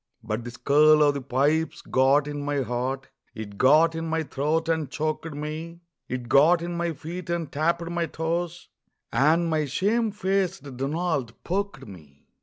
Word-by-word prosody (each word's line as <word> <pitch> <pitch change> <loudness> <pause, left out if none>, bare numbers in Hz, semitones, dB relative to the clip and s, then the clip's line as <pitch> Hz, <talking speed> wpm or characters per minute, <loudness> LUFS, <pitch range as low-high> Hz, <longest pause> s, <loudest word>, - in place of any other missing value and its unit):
But 110 +1 -3
the 120 - -6
skirl 150 +5 +4
o' 145 - +5
the 140 -1 -4
pipes 140 +5 0
got 135 +3 +3
in 145 -1 -4
my 145 -1 -1
heart, 130 +3 -3 0.3
It 105 -2 -8
got 155 +5 +5
in 165 0 -4
my 160 0 0
throat 155 +3 -1
and 160 -4 0
choked 155 +2 -3
me, 160 +3 -6 0.3
It 125 -1 -4
got 160 +7 +5
in 175 0 -4
my 170 -1 -1
feet, 170 +5 -7
and 170 -4 -2
tapped 170 +3 0
my 170 -1 -1
toes, 170 +2 -3 0.4
And 160 +5 +3
my 155 -2 +1
shame 215 - +1
faced 190 -7 -2
Donald 140 -2 -2
poked 190 -7 -3
me. 75 -8 -14
155 Hz, 165 wpm, -25 LUFS, 135-170 Hz, 0.4 s, o